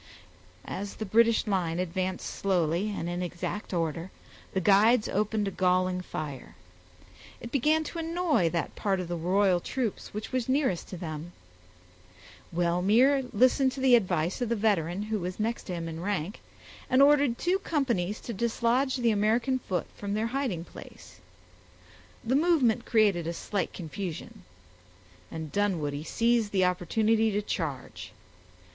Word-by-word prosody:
As 200 +1 -5
the 220 - -5
British 230 +2 +3
line 180 -6 0
advanced 185 +1 -2
slowly 180 0 0
and 200 -5 -4
in 175 +1 -3
exact 180 +3 -4
order, 165 0 -2 0.4
the 190 - 0
guides 210 +5 +4
opened 210 +1 0
a - - -2
galling 185 0 +1
fire. 150 -6 -7 0.8
It 235 - -8
began 305 +4 +2
to 335 +2 -6
annoy 325 - +1
that 170 -1 -3
part 195 -3 0
of 180 - -4
the 175 - -3
royal 180 +2 +2
troops 235 +3 -3
which 210 +1 -6
was 255 -1 -1
nearest 260 - +1
to 185 - -7
them. 165 0 -6 1.2
Wellmere 200 +11 +3
listened 255 +3 +3
to - - -7
the 260 -1 +4
advice 180 -3 +2
of 245 - -1
the 235 - +1
veteran, 200 -4 0
who 215 0 -2
was 180 +2 -5
next 230 +2 -2
to 185 - -5
him 165 -1 -4
in 165 0 -6
rank, 195 0 -3 0.5
and 255 - +3
ordered 285 -4 +4
two 365 +3 +1
companies 235 - -1
to 235 - -6
dislodge 235 +4 +1
the 240 -2 +2
American 230 +5 +1
foot 185 -7 -2
from 200 0 -4
their 215 +1 0
hiding 250 -12 -1
place. - - -13 1.0
The 240 +3 +1
movement 275 -8 +3
created 205 -8 +3
a 170 - -2
slight 200 +3 -3
confusion; 175 0 -6 0.9
and 160 -2 -6
Dunwoodie 160 -8 -1
seized 230 +3 +1
the 190 -2 +3
opportunity 215 +5 +2
to 205 +1 0
charge. 150 -10 -5
205 Hz, 150 wpm, -28 LUFS, 175-235 Hz, 1.2 s, guides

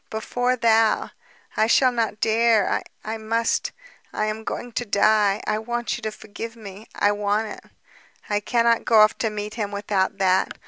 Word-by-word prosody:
Before 245 +3 -1
thou! 225 -2 +2 0.4
I 220 - +2
shall 255 +2 +4
not 225 -3 -2
dare. 225 -2 +2 0.2
I 220 +1 -3
must... 230 +1 -1 0.4
I 215 - -1
am 215 +1 -4
going 245 +2 -5
to 245 - -2
die... 210 -1 +2
I 215 0 0
want 240 +1 -3
you - - -8
to 215 -1 -3
forgive 220 +2 -8
me. 210 -1 -11
I 205 - +2
want 205 +1 -1
it... - - -11 0.6
I 205 -1 0
cannot 235 +1 +1
go 225 -3 +4
off 215 +1 +5
to 225 - 0
meet 210 0 -5
him 215 -3 -3
without 200 -1 -1
that. 190 -1 +2
220 Hz, 175 wpm, -23 LUFS, 210-230 Hz, 0.6 s, off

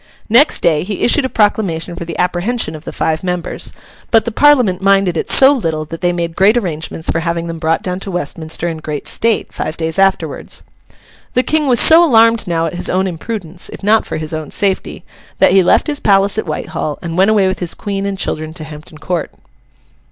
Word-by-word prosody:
Next 250 +8 +4
day, 155 -3 +3
he 200 +1 -4
issued 265 +3 +3
a - - -2
proclamation 190 -7 0
for 170 -1 -6
the 165 -1 -6
apprehension 180 +2 -1
of 155 0 -10
the - - -5
five 160 +1 -2
members; 180 -2 -4 0.4
but 225 -2 +3
the 235 - -2
Parliament 245 -8 +3
minded 195 -2 +2
it - - -3
so 270 +1 +6
little 160 - -2
that 165 +2 -8
they 175 -1 +2
made 170 -1 -3
great 205 +5 +4
arrangements 160 -5 -3
for - - -1
having 170 0 -2
them 165 -1 -6
brought 160 0 0
down 180 0 -3
to 195 - -6
Westminster 165 -1 -3
in 165 -2 -3
great 150 -2 -6
state, 230 -1 -1
five 155 +1 -4
days 160 +2 -3
afterwards. 195 0 -1 0.7
The 250 - +3
King 305 0 0
was 245 -3 +4
so 325 +2 +7
alarmed 230 - +4
now 165 -1 0
at 165 - -4
his 175 - -2
own 185 +1 +1
imprudence, 180 -1 -5
if - - -10
not 215 +2 +3
for - - -4
his 155 0 -4
own 155 -1 -5
safety, 195 -2 -2 0.3
that - - +4
he 190 0 +5
left 180 - +3
his 295 -2 -1
palace 200 +1 +2
at 220 - -4
Whitehall, 155 -1 -4
and 165 -1 -4
went 190 +3 +3
away 205 -3 +3
with 190 - -2
his 175 -2 -2
Queen 200 -1 -4
and 195 -1 -3
children 155 -2 -3
to 165 - -6
Hampton 155 0 -11
Court. 170 +1 -3
180 Hz, 215 wpm, -15 LUFS, 165-210 Hz, 0.7 s, so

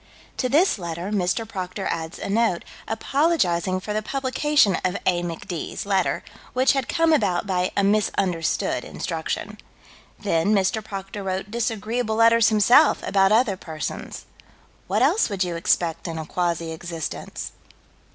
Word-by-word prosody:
'" - - -27
To 255 - 0
this 305 - +3
letter 170 +2 -4
Mr. 205 +3 0
Proctor 190 -1 -5
adds 160 0 -4
a - - -5
note, 210 -3 +1 0.2
apologizing 220 - +1
for 210 +3 -5
the 215 - 0
publication 265 - +2
of 185 +1 0
"A. 175 -1 +2
Mc. 170 -2 -6
D's." 175 +1 -4
letter, 195 -3 +1 0.3
which 260 +2 +4
had 270 -3 -2
come 330 -1 +3
about 185 - +1
by 185 -2 0
a 200 - +3
misunderstood 195 -5 0
instruction. - - -4 0.6
Then 165 +6 +1
Mr. 200 +3 +1
Proctor 195 0 -6
wrote 190 +1 -3
disagreeable 225 0 -1
letters, 230 0 +5
himself, 235 +8 +5
about 195 0 +3
other 220 -2 +3
persons 160 -4 -6 0.6
what - - +2
else 440 - +3
would 195 -2 0
you 175 -2 -3
expect 165 0 0
in 165 -1 -4
a 160 - -4
quasi 170 -1 -1
existence? 165 -1 -6
195 Hz, 150 wpm, -23 LUFS, 175-230 Hz, 0.6 s, letters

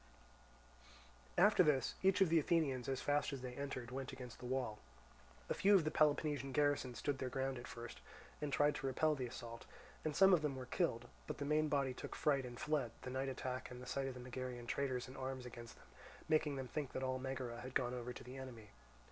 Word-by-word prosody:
After 200 +2 +7
this, 145 -7 +3
each 195 +1 +4
of 190 - +6
the 165 0 +6
Athenians 140 -6 +1
as 135 - -1
fast 145 +1 +2
as 135 -2 -5
they 125 -1 -4
entered 125 -3 -4
went 135 +1 -4
against 125 -2 -8
the 125 - -6
wall. 125 -5 -1 0.7
A - - +1
few 200 +1 +5
of 185 - +6
the 155 - 0
Peloponnesian 145 -3 +2
garrison 145 -4 +2
stood 140 +1 -1
their 130 - -1
ground 135 0 -1
at 120 - -8
first, 120 0 -8 0.4
and 150 -1 -1
tried 145 +1 +4
to 135 - -2
repel 155 +4 +3
the 130 -4 -2
assault, 115 -1 -8 0.4
and 155 -2 -1
some 195 +2 +8
of 170 - +5
them 150 -3 0
were 130 -1 -5
killed; 120 -4 0 0.2
but - - -3
the 145 - -3
main 155 +1 +3
body 140 -3 +2
took - - -6
fright 140 -4 +2
and 120 0 -8
fled; 150 -6 +1
the 130 - -4
night 135 +1 -1
attack 130 -1 -3
and 125 - -8
the 125 - -8
sight 135 +1 -1
of 130 - -4
the - - -7
Megarian 125 -1 -5
traitors 130 0 -1
in 130 - -10
arms 130 -1 -4
against 120 -1 -9
them - - -18 0.4
making 155 -2 +3
them 130 -1 -4
think 145 0 -3
that 130 - -2
all 130 0 0
Megara 130 -2 -4
had 130 +1 -7
gone 125 -1 +2
over 125 0 -4
to - - -8
the 125 +2 -8
enemy. 120 -6 -8
130 Hz, 225 wpm, -39 LUFS, 125-145 Hz, 0.7 s, some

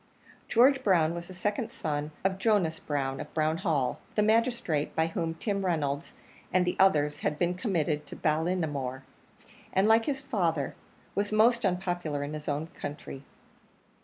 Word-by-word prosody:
George 265 +3 +5
Brown 170 -5 +3
was 170 0 -6
the 185 - -9
second 210 +5 -2
son 150 - -3
of 190 0 0
Jonas 190 -7 +2
Brown, 135 -2 -2
of - - -7
Brown 155 0 +1
Hall, 155 -9 0 0.2
the 210 - +3
magistrate 220 - +1
by 160 - +3
whom 165 0 -2
Tim 200 +2 -2
Reynolds 150 -4 -1 0.4
and 180 0 +3
the 180 - 0
others 150 -6 +4
had 150 - -1
been 175 +2 +1
committed 160 - -1
to - - -8
Ballinamore, 155 -5 -1 0.7
and, 190 +2 +3
like 225 +1 +5
his 275 -2 0
father, 165 - -1 0.4
was 205 +1 -1
most 235 +3 +4
unpopular 175 -6 -1
in 145 +1 -5
his 150 -1 -7
own 145 +2 -1 0.2
country. 145 -2 -6
170 Hz, 160 wpm, -29 LUFS, 150-200 Hz, 0.7 s, George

